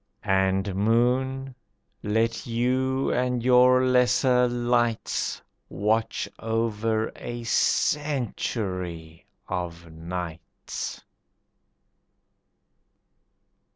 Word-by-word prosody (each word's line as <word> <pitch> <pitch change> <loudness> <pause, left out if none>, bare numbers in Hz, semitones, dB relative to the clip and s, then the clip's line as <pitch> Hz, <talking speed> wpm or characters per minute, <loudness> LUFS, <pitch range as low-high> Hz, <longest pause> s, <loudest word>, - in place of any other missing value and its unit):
And, 95 0 +1
Moon, 125 +6 +1 0.5
let 115 +3 0
you 130 +3 0
and 125 -1 0
your 125 +1 +5
lesser 125 0 +3
lights 120 -1 0 0.3
Watch 110 +2 0
over 110 -1 -1
a 120 0 -6
century 100 - -1 0.2
of 85 -2 -5
nights. 85 0 -6
115 Hz, 60 wpm, -26 LUFS, 95-125 Hz, 0.5 s, your